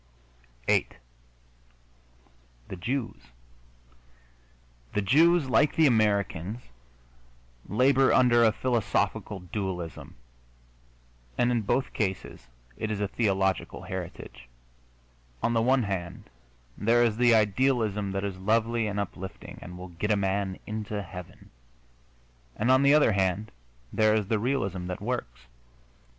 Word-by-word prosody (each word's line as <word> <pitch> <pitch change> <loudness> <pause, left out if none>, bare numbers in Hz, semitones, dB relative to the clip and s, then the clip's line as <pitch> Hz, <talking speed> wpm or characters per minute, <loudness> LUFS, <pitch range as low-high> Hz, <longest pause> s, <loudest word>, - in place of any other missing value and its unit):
VIII - - +3 1.8
THE - - -5
JEWS 120 - -3 1.8
The 105 - 0
Jews, 160 - +4
like 140 +3 +3
the 160 - +4
Americans, 105 - +1 1.1
labor 130 +4 +4
under 120 -2 +5
a 110 - +5
philosophical 105 -4 -1
dualism, 90 -3 -5 1.2
and 120 0 +2
in 120 -2 +1
both 130 +5 -1
cases 95 - -3 0.3
it 110 - -3
is 105 -2 -2
a 105 - 0
theological 95 -3 -1
heritage. - - -8 1.0
On 120 - +2
the 115 - +2
one 130 +2 +3
hand 95 -4 -5 0.4
there 115 +3 +3
is 110 -2 +1
the 120 -1 +5
idealism 105 -2 +1
that 95 0 -2
is 95 -2 -4
lovely 115 +3 +1
and 100 0 -3
uplifting 95 -1 -7
and 90 0 -9
will 90 0 -9
get 85 +5 -4
a 105 - +3
man 95 -1 -1
into 105 -1 -4
heaven, 90 -1 -11 1.0
and 120 +4 +1
on 130 +1 +5
the 140 +1 +5
other 150 -6 +5
hand 95 +1 0 0.4
there 110 0 +3
is 105 -3 -1
the 110 - +1
realism 100 -7 -2
that 90 - -4
works. 100 - -4
105 Hz, 120 wpm, -27 LUFS, 95-120 Hz, 1.8 s, under